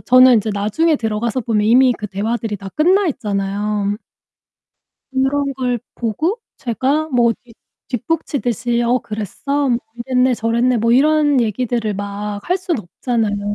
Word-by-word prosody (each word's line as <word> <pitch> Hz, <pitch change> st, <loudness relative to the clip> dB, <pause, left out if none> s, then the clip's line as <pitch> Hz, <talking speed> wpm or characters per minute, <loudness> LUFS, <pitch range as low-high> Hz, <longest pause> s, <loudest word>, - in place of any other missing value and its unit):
저는 255 Hz, 0 st, +6 dB
인제 220 Hz, -1 st, +1 dB
나중에 215 Hz, +11 st, +1 dB
들어가서 225 Hz, +1 st, -1 dB
보면 215 Hz, -3 st, 0 dB
이미 250 Hz, +3 st, +5 dB
그 210 Hz, -, -5 dB
대화들이 215 Hz, +2 st, -2 dB
다 195 Hz, 0 st, -8 dB
끝나 370 Hz, +6 st, +3 dB
있잖아요. 205 Hz, -4 st, -2 dB, 1.2 s
그런 275 Hz, +1 st, +1 dB
걸 250 Hz, -2 st, -1 dB, 0.2 s
보고 305 Hz, -, -1 dB, 0.2 s
제가 270 Hz, +6 st, 0 dB
뭐 240 Hz, -3 st, +3 dB
뒷 235 Hz, -2 st, -18 dB, 0.3 s
뒷북치듯이 245 Hz, -, -1 dB
"어 240 Hz, +2 st, +2 dB
그랬어? 255 Hz, +6 st, -3 dB
뭐 235 Hz, -1 st, +2 dB, 0.3 s
이랬네 255 Hz, 0 st, +2 dB
저랬네." 235 Hz, +2 st, +1 dB
뭐 230 Hz, +2 st, +1 dB
이런 290 Hz, +1 st, +4 dB
얘기들을 225 Hz, -1 st, -1 dB
막 205 Hz, +1 st, -4 dB
할 365 Hz, +2 st, +2 dB
순 360 Hz, -5 st, -2 dB
없잖아요. 205 Hz, +1 st, -2 dB
240 Hz, 290 characters per minute, -18 LUFS, 210-265 Hz, 1.2 s, 저는